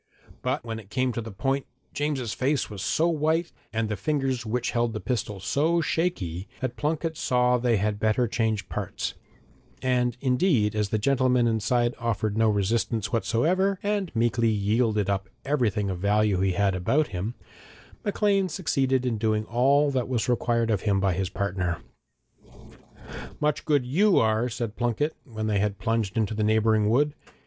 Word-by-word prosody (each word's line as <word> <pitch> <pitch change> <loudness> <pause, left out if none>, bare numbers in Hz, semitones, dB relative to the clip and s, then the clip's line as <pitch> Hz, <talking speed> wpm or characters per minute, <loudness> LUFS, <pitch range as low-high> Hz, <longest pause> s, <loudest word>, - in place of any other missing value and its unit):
But - - -2
when 110 -1 -4
it 100 -3 -14
came 130 +3 0
to 115 - -3
the 115 - -7
point, 135 +8 -1 0.3
James's 140 -6 -2
face 135 -2 0
was 100 -3 -6
so 160 - +1
white, 165 +1 +1 0.2
and 110 +1 -1
the 105 - -2
fingers 130 - -1
which 120 +2 -1
held 120 -2 0
the 110 - -3
pistol 105 -1 -3
so 155 - +1
shaky, 100 - -1
that 130 -2 -3
Plunket 160 +2 -1
saw 125 0 +2
they 120 -2 +2
had 105 +1 -1
better 110 +3 +2
change 110 -2 -1
parts, - - -4 0.7
and 125 -2 +1
indeed, 125 - +2
as 105 -1 0
the 110 - +1
gentleman 125 +1 +2
inside 120 +1 +1
offered 110 -3 -1
no 110 0 +3
resistance 105 +2 0
whatever, 175 - +1
and 205 -3 -1
meekly 115 0 +2
yielded 105 0 +1
up 95 -1 -1 0.2
everything 115 -8 +1
of 90 - -4
value 105 0 +2
he 95 -1 +1
had 100 +1 +2
about 135 - +1
him, 100 +6 -4 0.7
Maclean 200 -2 +1
succeeded 135 -7 0
in 115 -4 -1
doing 110 -1 +1
all 140 +5 +3
that 130 -2 -1
was 120 -3 0
required 115 -1 +1
of 100 -3 +1
him 100 -2 +1
by 95 -1 +2
his 95 +1 -2
partner. 90 -5 -2 1.6
'Much 150 0 0
good 145 -5 +2
you 185 +10 +3
are!' 110 +2 +2
said 115 -2 -4
Plunket, 120 +6 0
when 110 -5 -5
they 105 -2 +1
had 100 0 0
plunged 110 -1 -1
into 110 -1 +1
the 110 0 -1
neighbouring 110 0 +3
wood. 145 +6 +2
115 Hz, 170 wpm, -26 LUFS, 105-135 Hz, 1.6 s, no